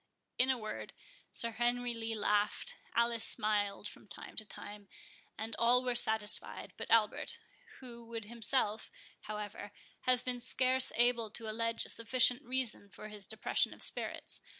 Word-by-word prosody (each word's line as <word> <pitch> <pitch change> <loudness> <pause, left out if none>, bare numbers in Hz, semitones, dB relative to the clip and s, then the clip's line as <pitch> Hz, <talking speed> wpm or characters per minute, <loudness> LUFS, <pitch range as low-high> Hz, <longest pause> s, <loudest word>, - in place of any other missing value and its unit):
In 255 +1 +4
a 260 - +2
word, 215 -2 -7 0.4
Sir 235 - 0
Henry 240 +1 0
Lee 225 -1 -4
laughed, 210 0 0 0.2
Alice 235 0 +2
smiled 205 -1 +1
from - - -11
time - - -10
to 220 - -1
time, 205 0 -9 0.5
and 225 +1 -4
all 245 +2 +4
were 250 -1 0
satisfied 220 -3 +3
but - - -7
Albert, 225 -2 +2 0.4
who 235 -2 -10
would 230 -2 -6
himself, 225 -1 -1 0.4
however, 210 -1 -6 0.4
have 250 -1 +3
been 250 -1 -2
scarce 255 +1 +3
able 240 -2 +2
to 225 +1 -4
allege 230 +1 -2
a - - +1
sufficient 245 +1 +5
reason 250 -5 -3
for 215 +2 -10
his 210 -2 -4
depression 220 - 0
of - - -7
spirits. - - -2
230 Hz, 150 wpm, -33 LUFS, 210-245 Hz, 0.5 s, sufficient